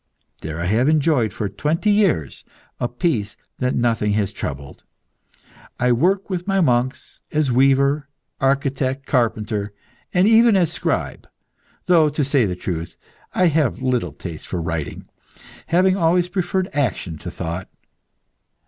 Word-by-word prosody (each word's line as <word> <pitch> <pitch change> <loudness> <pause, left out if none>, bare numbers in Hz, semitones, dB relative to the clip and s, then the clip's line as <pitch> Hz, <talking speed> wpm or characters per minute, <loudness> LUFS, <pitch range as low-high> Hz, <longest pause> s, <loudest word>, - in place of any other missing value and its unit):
There 80 +1 -6
I 85 - -2
have 115 +9 +2
enjoyed 150 -8 +2
for 105 - -3
twenty 155 - 0
years 190 - +1 0.4
a 120 - 0
peace 120 - -2 0.2
that 125 0 0
nothing 115 -3 +1
has 105 -1 0
troubled. 70 -6 -6 1.0
I 125 0 +3
work 185 +11 +2
with 180 -1 -4
my 195 -1 +2
monks 130 -4 0
as 150 -3 +1
weaver, 135 +3 +3 0.3
architect, 135 0 0
carpenter, 110 -4 -1 0.4
and 180 +2 +3
even 225 0 +6
as 175 -4 +2
scribe, - - -3 0.6
though, 165 -4 +5
to 145 0 -1
say 135 -4 +2
the 90 - -3
truth, 85 -2 -5 0.4
I 185 - +3
have 145 -4 0
little 125 - 0
taste 80 +1 -8
for 90 - -3
writing, 80 -2 -4 0.6
having 185 +3 +3
always 175 0 +2
preferred 185 0 -1
action 110 - -2
to - - -6
thought. 85 +3 -5
130 Hz, 140 wpm, -21 LUFS, 105-165 Hz, 1.0 s, even